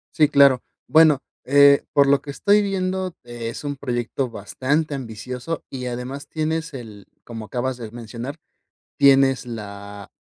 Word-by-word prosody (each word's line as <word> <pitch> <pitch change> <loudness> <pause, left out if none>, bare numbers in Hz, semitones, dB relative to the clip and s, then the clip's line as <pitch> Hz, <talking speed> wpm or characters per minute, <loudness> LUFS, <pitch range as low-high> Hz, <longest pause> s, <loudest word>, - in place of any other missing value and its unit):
Sí, 150 -2 +4
claro. 140 -3 +5 0.2
Bueno, 155 -3 +6 0.2
eh, 140 +1 +6
por 140 -1 +5
lo 140 0 +4
que 140 - -7
estoy 205 +8 +3
viendo, 185 -2 -2
es 120 0 -6
un 145 -1 -3
proyecto 125 -1 -3
bastante 140 +8 -2
ambicioso 125 +4 -6
y 130 -2 -6
además 125 +4 -5
tienes 160 +1 -2
el, 110 -6 -9 0.2
como 115 -2 -8
acabas 125 +4 -3
de 115 -3 -8
mencionar, 120 +4 -7 0.6
tienes 135 -2 +4
la 100 -3 -8
135 Hz, 140 wpm, -22 LUFS, 120-145 Hz, 0.6 s, Bueno